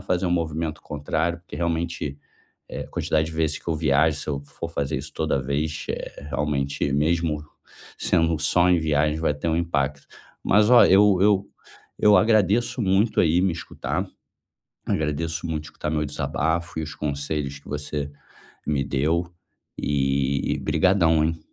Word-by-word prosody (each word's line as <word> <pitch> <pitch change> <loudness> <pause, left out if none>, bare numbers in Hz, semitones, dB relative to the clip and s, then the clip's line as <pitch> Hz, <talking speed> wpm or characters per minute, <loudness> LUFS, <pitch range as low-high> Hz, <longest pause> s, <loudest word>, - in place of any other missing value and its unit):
fazer 90 0 -1
um - - 0
movimento 80 -2 -2
contrário, 80 +4 -2
porque 85 - -10
realmente, 85 -4 -2 0.5
eh, - - -5
quantidade 80 0 -1
de 80 - -7
vezes 80 -1 0
que - - -10
eu 80 - +1
viajo 75 0 +2
se - - -7
eu 70 -2 -1
for 70 +3 -7
fazer 70 -4 -2
isso - - -8
toda 70 - 0
vez, 75 +4 -2
eh, 70 - -6
realmente 70 -2 -1
mesmo 75 +1 +1 0.6
sendo 80 -2 +2
só 90 +3 +3
em 90 - +4
viagem, 75 -1 +1
vai 75 -2 +1
ter 80 +3 -3
um 80 - +1
impacto. 75 -4 -1 0.4
Mas 105 +3 +4
olha, 125 - +7
eu 100 0 +6
eu 100 0 +3 0.5
eu 105 -1 +6
agradeço 110 +4 +3
muito 100 +3 +2
aí 85 +1 +3
me 95 -1 +2
escutar. 80 - -4 0.8
Agradeço 80 +3 -1
muito 75 -2 -3
escutar 75 -1 -5
meu 75 -1 0
desabafo 80 +3 -2
e - - -3
os 75 -1 -6
conselhos 70 -1 -3
que 70 - -17
você 75 0 -4 0.6
me 70 -2 +1
deu 80 +6 0 0.5
e 70 -1 0
obrigadão, 85 -5 +3
hein. 80 +1 -1
80 Hz, 155 wpm, -24 LUFS, 75-85 Hz, 0.8 s, olha